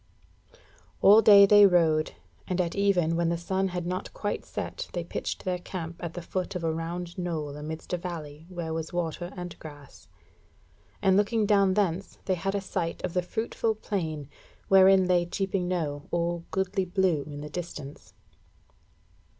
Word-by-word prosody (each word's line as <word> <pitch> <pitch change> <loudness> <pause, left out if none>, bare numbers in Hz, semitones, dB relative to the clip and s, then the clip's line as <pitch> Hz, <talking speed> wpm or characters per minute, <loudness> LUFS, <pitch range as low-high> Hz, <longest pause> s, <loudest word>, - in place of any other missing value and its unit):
All 210 +3 +8
day 200 -2 +9
they 205 0 +8
rode, 160 - +2 0.3
and 185 0 -2
at 170 -2 0
even 185 -5 +2
when 170 0 +1
the 170 - 0
sun 190 +3 -1
had 180 -2 -4
not 180 +1 -3
quite 205 - -3
set, - - -5
they - - -2
pitched - - -5
their 180 -1 -1
camp 170 -2 -6
at 170 -1 -5
the 175 - -5
foot 185 +2 -3
of 180 - -3
a 160 -1 0
round 170 +2 -5
knoll 155 -5 -3
amidst 155 +3 -7
a - - +2
valley 160 -3 -7
where 170 -3 -4
was 160 0 -4
water 175 0 -3
and 180 -1 -7
grass; 145 -3 -12 1.0
and 190 -1 +5
looking 210 +1 +2
down 200 -2 +3
thence, 195 -2 -1
they 190 - +1
had 195 +2 -2
a 200 - 0
sight 180 -3 -3
of 180 - -2
the 180 - +2
fruitful 220 +3 -2
plain, 160 -9 -3 0.4
wherein 190 0 +7
lay 180 -1 +3
Cheaping 190 +1 -2
Knowe 150 -5 -2
all 170 0 -1
goodly 190 0 -1
blue 180 -4 +1
in 145 -1 -7
the 150 - -6
distance. 150 -4 -8
175 Hz, 170 wpm, -27 LUFS, 165-190 Hz, 1.0 s, day